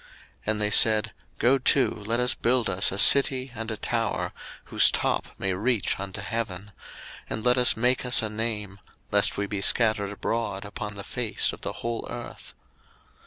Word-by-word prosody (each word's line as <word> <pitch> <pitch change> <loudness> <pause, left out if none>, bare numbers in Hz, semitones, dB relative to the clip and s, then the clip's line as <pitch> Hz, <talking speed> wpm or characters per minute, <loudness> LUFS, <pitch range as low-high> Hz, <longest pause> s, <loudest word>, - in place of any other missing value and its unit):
01:011:004 - - -23 0.4
And 105 0 -3
they 105 0 0
said, 110 0 +4 0.2
Go 130 +3 +3
to, 130 +1 +3
let 110 +3 -3
us 125 0 +3
build 120 -1 +1
us 95 - +2
a 95 - -4
city 135 +2 +4
and 115 -1 -7
a 110 - -4
tower, 115 +1 -2 0.3
whose - - +4
top - - -1
may 95 -1 -2
reach 105 +2 -1
unto 95 -1 -5
heaven; 100 -2 -5 0.6
and 110 +1 -5
let 125 0 +4
us 125 -3 +4
make 125 +3 +1
us 125 -2 +3
a - - -1
name, 105 -3 -3 0.3
lest - - +3
we 100 - -2
be 100 -1 -5
scattered 110 -2 +3
abroad 105 -1 -4
upon 105 0 -7
the 100 - -7
face 120 0 -2
of - - -12
the - - -4
whole 115 -1 -4
earth. 120 0 -9
110 Hz, 180 wpm, -25 LUFS, 105-120 Hz, 0.6 s, said